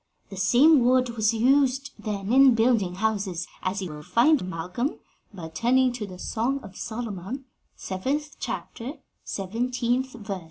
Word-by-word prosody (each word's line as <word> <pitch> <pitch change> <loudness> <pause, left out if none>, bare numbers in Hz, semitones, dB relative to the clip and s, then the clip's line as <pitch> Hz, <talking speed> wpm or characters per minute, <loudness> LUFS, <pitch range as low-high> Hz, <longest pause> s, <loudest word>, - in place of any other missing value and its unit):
The - - -6
same 250 - +5
wood 250 0 +3
was 215 -1 +2
used 270 +3 +2
then 210 0 -3
in 265 -2 +7
building 225 -6 +2
houses, 195 -4 -1 0.2
as 190 +1 -2
you 180 - -5
will 150 0 -8
find, 230 - +3
Malcolm, 180 - -3 0.3
by 175 -6 -8
turning 250 +9 +2
to 225 -4 -5
the 185 -2 -10
Song 240 +8 -1
of 190 - -11
Solomon, 225 +2 -5 0.3
seventh 275 +11 -3
chapter, 250 +4 -5 0.3
seventeenth 245 +5 -1
verse." 205 -5 -5
230 Hz, 145 wpm, -26 LUFS, 190-255 Hz, 0.3 s, in